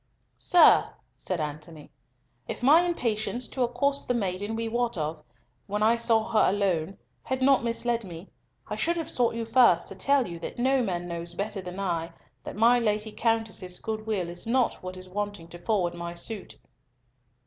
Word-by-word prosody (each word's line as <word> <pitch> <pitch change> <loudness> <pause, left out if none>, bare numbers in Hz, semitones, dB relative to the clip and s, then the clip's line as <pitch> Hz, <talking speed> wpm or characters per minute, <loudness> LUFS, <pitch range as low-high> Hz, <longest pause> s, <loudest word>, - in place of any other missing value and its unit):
"Sir," 355 -2 +5 0.3
said 185 -2 -4
Antony, 150 +1 -7 0.6
"if - - -6
my 300 +6 +7
impatience 245 -8 -1
to 260 - -4
accost 265 +4 0
the 245 - +1
maiden 205 0 -2
we 230 0 -2
wot 235 -1 -1
of, 155 0 -3 0.5
when 210 +1 -1
I 225 +2 +5
saw 230 -1 +2
her 215 - +4
alone, 190 -3 0 0.2
had 260 0 -2
not 270 -1 +4
misled 235 0 -1
me, 175 -1 -9 0.4
I 210 - -4
should 335 +11 +1
have 325 - -3
sought 240 -2 +1
you 230 0 -3
first 225 -7 +4
to 195 - -8
tell 275 +5 +2
you 170 -1 -7
that - - -7
no 260 +2 +2
man 175 -6 -2
knows 170 0 -5
better 200 +1 -3
than 180 +1 -7
I 170 -4 -2 0.3
that - - -7
my 235 +3 +5
Lady 215 -1 0
Countess's 220 -6 -1
good 220 0 -5
will 195 -5 -1
is 175 +4 -3
not 250 +1 +1
what 185 0 -7
is 185 0 -9
wanting 205 -2 -4
to 175 - -10
forward 180 -3 0
my 170 0 -6
suit." 200 +3 -6
215 Hz, 180 wpm, -27 LUFS, 180-240 Hz, 0.6 s, my